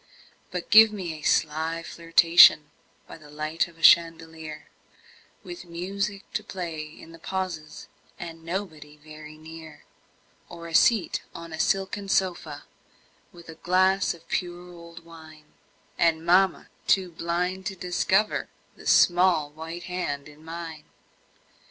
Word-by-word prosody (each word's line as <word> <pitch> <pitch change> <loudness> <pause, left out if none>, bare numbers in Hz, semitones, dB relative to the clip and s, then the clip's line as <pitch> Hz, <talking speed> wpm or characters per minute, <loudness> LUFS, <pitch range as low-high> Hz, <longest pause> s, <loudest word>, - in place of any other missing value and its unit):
But 180 -1 -6
give 220 0 +9
me 185 -6 -5
a 155 - -10
sly 160 +3 0
flirtation 165 -3 +5 0.3
By - - -12
the 150 -2 -16
light 155 +3 -2
of 170 -1 -19
a 165 - -15
chandelier 160 -2 +3 0.8
With 350 -1 -9
music 195 +4 -4
to - - -2
play 170 -4 -6
in 160 +1 -14
the 165 - -14
pauses, 175 -4 -5 0.3
And 165 -1 -9
nobody 165 -4 -6
very 155 0 -13
near; 160 -1 -12 0.7
Or 170 -1 -10
a 165 - -9
seat 200 0 +3
on 165 -1 -9
a 160 - -7
silken 195 +2 -1
sofa, 175 -6 -1 0.7
With 170 -1 -15
a 165 - -9
glass 185 +1 +2
of 165 - -20
pure 175 0 -4
old 170 -1 -13
wine, 155 -2 -15 0.5
And 165 -1 +2
mamma 185 +2 +2 0.2
too 185 -2 +2
blind 180 +3 -3
to 195 - -5
discover 185 +3 0 0.3
The - - -11
small 175 -4 +4
white 165 +3 -8
hand 150 -6 -4
in 150 +1 -16
mine. 165 -1 -8
170 Hz, 135 wpm, -25 LUFS, 160-180 Hz, 0.8 s, give